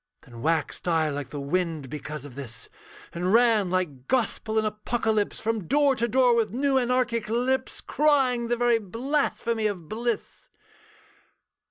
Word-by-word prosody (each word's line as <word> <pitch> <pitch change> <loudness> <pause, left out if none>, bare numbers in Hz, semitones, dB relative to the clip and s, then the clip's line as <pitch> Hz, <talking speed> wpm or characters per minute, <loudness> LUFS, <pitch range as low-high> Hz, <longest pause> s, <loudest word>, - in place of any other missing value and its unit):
Then 120 -2 -12
waxed 160 +3 -1
I 160 -2 +2
like 145 -1 -4
the 145 - -6
wind 160 0 -1
because 150 0 -6
of 140 - -10
this, 115 -4 -8 0.4
And 180 +2 -1
ran, 225 -4 +4
like 160 -8 -2
gospel 220 -3 0
and 220 - +2
apocalypse, 215 0 -1
From 225 -4 -2
door 285 0 +3
to 235 -1 0
door, 250 +1 +4
with 225 -2 +1
new 265 +5 +1
anarchic 240 -3 0
lips, 250 +3 0
Crying 265 -6 +2
the 240 0 0
very 240 -1 +3
blasphemy 230 0 -1
of 180 -6 -5
bliss. 235 - -4
220 Hz, 150 wpm, -26 LUFS, 165-245 Hz, 0.4 s, ran